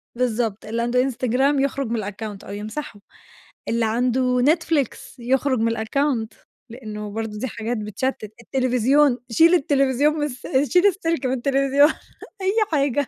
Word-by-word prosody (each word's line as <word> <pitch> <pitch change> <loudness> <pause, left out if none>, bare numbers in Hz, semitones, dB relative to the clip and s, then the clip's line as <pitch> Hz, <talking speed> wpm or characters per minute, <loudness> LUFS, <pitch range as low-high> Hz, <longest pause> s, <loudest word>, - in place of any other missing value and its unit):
بالضبط، 230 -4 -1
اللي 230 +2 -2
عنده 245 +1 +2
إنستجرام 265 +2 +1
يخرُج 275 -1 -1
من 225 -3 -1
الaccount 205 0 -6
أو 200 - -8
يمسحه، 210 +2 -6 0.7
اللي 230 0 +1
عنده 250 +2 +1
نتفليكس 300 -3 0
يخرُج 260 +1 +1
من 230 +1 0
الaccount، 230 0 0 0.4
لأنه 210 -3 -7
برضو 220 -1 -4
دي 260 - -3
حاجات 225 +2 -4
بتشتت، 215 +1 -3
التليفزيون، 255 +2 +2
شيل 330 +9 +5
التليفزيون 280 -1 +2
من 300 -1 -2
الس 255 -3 -7 0.3
شيل 360 +3 +6
السلك 330 -7 -1
من 255 - 0
التليفزيون، 275 +3 +3 0.5
أي 380 +1 +1 0.2
حاجة. 280 -2 +1
250 Hz, 140 wpm, -22 LUFS, 225-280 Hz, 0.7 s, شيل